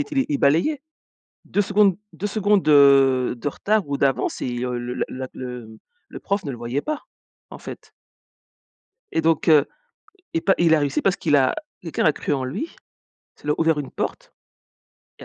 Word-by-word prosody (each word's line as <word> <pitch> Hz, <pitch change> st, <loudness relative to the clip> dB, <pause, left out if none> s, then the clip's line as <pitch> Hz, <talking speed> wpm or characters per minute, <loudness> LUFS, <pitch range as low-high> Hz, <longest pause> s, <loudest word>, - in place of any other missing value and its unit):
était 275 Hz, -2 st, -1 dB
il 145 Hz, -, 0 dB
balayait. 170 Hz, -, +2 dB, 0.6 s
2 205 Hz, -, -1 dB
secondes, 200 Hz, -2 st, +3 dB, 0.2 s
2 205 Hz, -, -4 dB
secondes 205 Hz, -1 st, +2 dB
de 135 Hz, -4 st, +5 dB
de 145 Hz, -, -2 dB
retard 210 Hz, +4 st, 0 dB
ou 140 Hz, -, -1 dB
d'avance 135 Hz, -1 st, 0 dB
et -, -, -2 dB
le 125 Hz, 0 st, -3 dB, 0.2 s
le -, -, -1 dB
la 130 Hz, 0 st, -6 dB
le, 125 Hz, -3 st, -7 dB
mmh, 110 Hz, 0 st, -14 dB, 0.3 s
le -, -, -9 dB
prof 200 Hz, 0 st, -2 dB
ne 140 Hz, -, -4 dB
le 125 Hz, -, -6 dB
voyait 120 Hz, +4 st, -3 dB
pas, 305 Hz, -, -4 dB, 0.5 s
en -, -, -9 dB
fait -, -, -10 dB, 1.2 s
et 165 Hz, -, +1 dB
donc, 160 Hz, +1 st, +1 dB
heu, 150 Hz, -2 st, +6 dB, 0.7 s
il 165 Hz, -, 0 dB
pa 195 Hz, -, +4 dB
il 165 Hz, -2 st, +4 dB
a -, -, +2 dB
réussi 145 Hz, -1 st, 0 dB
parce 195 Hz, -1 st, +2 dB
qu'il 150 Hz, -3 st, +2 dB
a 130 Hz, -2 st, +3 dB, 0.3 s
quelqu'un 165 Hz, -3 st, -3 dB
l'a 155 Hz, -, +4 dB
cru 145 Hz, -, -2 dB
en 135 Hz, -2 st, -2 dB
lui. 210 Hz, -, -5 dB, 0.6 s
Ça -, -, -25 dB
lui 150 Hz, -, +1 dB
a -, -, +1 dB
ouvert 160 Hz, -2 st, +2 dB
une 140 Hz, -, -6 dB
porte -, -, -5 dB, 0.9 s
et -, -, -11 dB
150 Hz, 195 wpm, -22 LUFS, 130-195 Hz, 1.2 s, heu